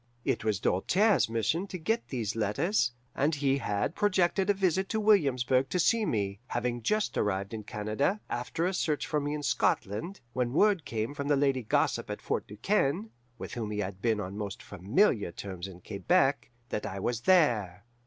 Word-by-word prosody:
It -, -, 0 dB
was 105 Hz, -4 st, 0 dB
Doltaire's 190 Hz, -, +2 dB
mission 115 Hz, -, 0 dB
to 185 Hz, -, -5 dB
get 225 Hz, +8 st, -1 dB
these 115 Hz, -5 st, -3 dB
letters, 120 Hz, -, +1 dB, 0.2 s
and 150 Hz, +3 st, +1 dB
he 140 Hz, -1 st, +1 dB
had 105 Hz, +4 st, -1 dB
projected 190 Hz, -1 st, +2 dB
a -, -, +6 dB
visit 190 Hz, 0 st, +1 dB
to 220 Hz, -, 0 dB
Williamsburg 135 Hz, -, +3 dB
to -, -, -1 dB
see 220 Hz, +4 st, +3 dB
me, 100 Hz, -2 st, -1 dB
having 120 Hz, 0 st, -2 dB
just 215 Hz, -, 0 dB
arrived 100 Hz, 0 st, -1 dB
in 110 Hz, -, -4 dB
Canada, 110 Hz, -, -1 dB
after 125 Hz, +7 st, -2 dB
a 185 Hz, -, 0 dB
search 155 Hz, -5 st, 0 dB
for 150 Hz, -, 0 dB
me 145 Hz, +1 st, -2 dB
in 150 Hz, -, -5 dB
Scotland, 120 Hz, -, 0 dB
when 125 Hz, -1 st, -1 dB
word 200 Hz, 0 st, +3 dB
came 115 Hz, +3 st, -3 dB
from 140 Hz, -1 st, -4 dB
the 145 Hz, -, +4 dB
lady 135 Hz, -2 st, +2 dB
gossip 110 Hz, -, 0 dB
at -, -, -4 dB
Fort -, -, -2 dB
Du 105 Hz, -, -11 dB
Quesne 195 Hz, -, 0 dB, 0.3 s
(with -, -, -7 dB
whom 115 Hz, -3 st, -3 dB
he 105 Hz, -, -4 dB
had 95 Hz, -2 st, -4 dB
been 110 Hz, -2 st, +1 dB
on 95 Hz, -1 st, -5 dB
most 100 Hz, -2 st, -5 dB
familiar 100 Hz, -, +1 dB
terms 95 Hz, 0 st, -6 dB
in 90 Hz, -2 st, -12 dB
Quebec) 135 Hz, -, +1 dB, 0.2 s
that 105 Hz, -, -3 dB
I 95 Hz, 0 st, -5 dB
was 120 Hz, +3 st, -1 dB
there. 115 Hz, -, +3 dB
125 Hz, 190 wpm, -29 LUFS, 105-175 Hz, 0.3 s, a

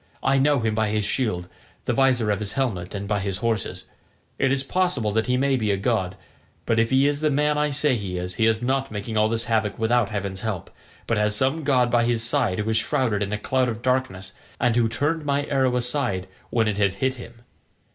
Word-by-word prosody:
I 135 Hz, 0 st, +3 dB
know 140 Hz, -1 st, +3 dB
him 110 Hz, -1 st, 0 dB
by 110 Hz, 0 st, +1 dB
his 105 Hz, -1 st, 0 dB
shield, 95 Hz, -10 st, -1 dB, 0.4 s
the -, -, +1 dB
visor 125 Hz, -5 st, +3 dB
of 100 Hz, -, 0 dB
his 105 Hz, -2 st, -4 dB
helmet, 105 Hz, -9 st, -2 dB
and 100 Hz, 0 st, -4 dB
by 105 Hz, 0 st, 0 dB
his 100 Hz, -1 st, -2 dB
horses. 110 Hz, -1 st, -2 dB, 0.5 s
It 135 Hz, -1 st, +2 dB
is 135 Hz, 0 st, +2 dB
possible 140 Hz, -, 0 dB
that 110 Hz, +1 st, 0 dB
he 125 Hz, 0 st, +2 dB
may 135 Hz, +1 st, +2 dB
be 110 Hz, -3 st, -1 dB
a 100 Hz, -, +2 dB
god, 95 Hz, -3 st, -1 dB, 0.5 s
but 115 Hz, -1 st, +2 dB
if 115 Hz, 0 st, +2 dB
he 135 Hz, +1 st, +4 dB
is 145 Hz, 0 st, 0 dB
the 155 Hz, -, +2 dB
man 150 Hz, +1 st, +2 dB
I 150 Hz, 0 st, +1 dB
say 145 Hz, -1 st, +2 dB
he 95 Hz, -5 st, -4 dB
is, 90 Hz, +1 st, -4 dB
he 110 Hz, +4 st, +2 dB
is 110 Hz, +1 st, +1 dB
not 135 Hz, +2 st, 0 dB
making 110 Hz, +1 st, -5 dB
all 110 Hz, 0 st, +3 dB
this 115 Hz, +1 st, -1 dB
havoc 110 Hz, -3 st, 0 dB
without 115 Hz, -1 st, +2 dB
heaven's 100 Hz, -3 st, -4 dB
help, 105 Hz, -6 st, -4 dB, 0.3 s
but 115 Hz, -2 st, 0 dB
has 105 Hz, 0 st, +2 dB
some 135 Hz, +7 st, +1 dB
god 125 Hz, -4 st, +2 dB
by 120 Hz, 0 st, +3 dB
his 120 Hz, -1 st, +1 dB
side 120 Hz, -6 st, +1 dB
who 110 Hz, +1 st, -1 dB
is 110 Hz, -, +2 dB
shrouded 115 Hz, -3 st, 0 dB
in 100 Hz, 0 st, -2 dB
a 105 Hz, -, -1 dB
cloud 130 Hz, +3 st, 0 dB
of 115 Hz, 0 st, -6 dB
darkness, 125 Hz, -8 st, -1 dB, 0.3 s
and 120 Hz, -2 st, +2 dB
who 115 Hz, -2 st, +3 dB
turned 150 Hz, +6 st, -1 dB
my 145 Hz, 0 st, 0 dB
arrow 135 Hz, -3 st, +1 dB
aside 120 Hz, -7 st, -1 dB, 0.2 s
when 115 Hz, -2 st, +1 dB
it 105 Hz, -1 st, -1 dB
had 100 Hz, -2 st, +2 dB
hit 130 Hz, +7 st, 0 dB
him. 120 Hz, -2 st, -12 dB
115 Hz, 235 wpm, -24 LUFS, 105-130 Hz, 0.5 s, he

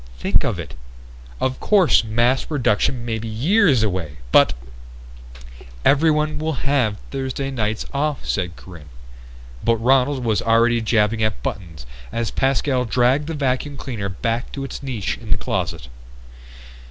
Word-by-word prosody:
Think 95 Hz, +9 st, +1 dB
of 110 Hz, -6 st, -1 dB
it! 75 Hz, -6 st, -7 dB, 0.7 s
Of 130 Hz, 0 st, -1 dB
course 195 Hz, -, +4 dB
mass 120 Hz, +4 st, +1 dB
production 120 Hz, -3 st, 0 dB
may 115 Hz, -2 st, -2 dB
be 115 Hz, -, -6 dB
years 140 Hz, -, +3 dB
away, 90 Hz, -8 st, -2 dB
but -, -, +6 dB, 0.7 s
..." -, -, -16 dB
"Everyone 150 Hz, +1 st, +3 dB
will 155 Hz, -4 st, -3 dB
have 125 Hz, -7 st, +1 dB
Thursday 135 Hz, 0 st, -3 dB
nights 110 Hz, -4 st, -2 dB
off," 145 Hz, +1 st, -1 dB
said 90 Hz, -3 st, -2 dB
Corinne 80 Hz, -5 st, -13 dB, 0.7 s
but 115 Hz, -, +3 dB
Ronald 130 Hz, +2 st, +2 dB
was 110 Hz, -4 st, +1 dB
already 115 Hz, +1 st, +3 dB
jabbing 110 Hz, 0 st, +1 dB
at 110 Hz, -1 st, -1 dB
buttons 85 Hz, -8 st, -5 dB, 0.3 s
as 115 Hz, -4 st, -2 dB
Pascal 135 Hz, -1 st, +1 dB
dragged 125 Hz, +5 st, +2 dB
the 165 Hz, -, -3 dB
vacuum 140 Hz, 0 st, -1 dB
cleaner 115 Hz, -8 st, -4 dB
back 115 Hz, +5 st, -3 dB
to 140 Hz, -, -4 dB
its 135 Hz, -, -6 dB
niche 125 Hz, -8 st, -3 dB
in -, -, -11 dB
the -, -, +2 dB
closet. -, -, -3 dB
120 Hz, 145 wpm, -21 LUFS, 105-135 Hz, 0.7 s, but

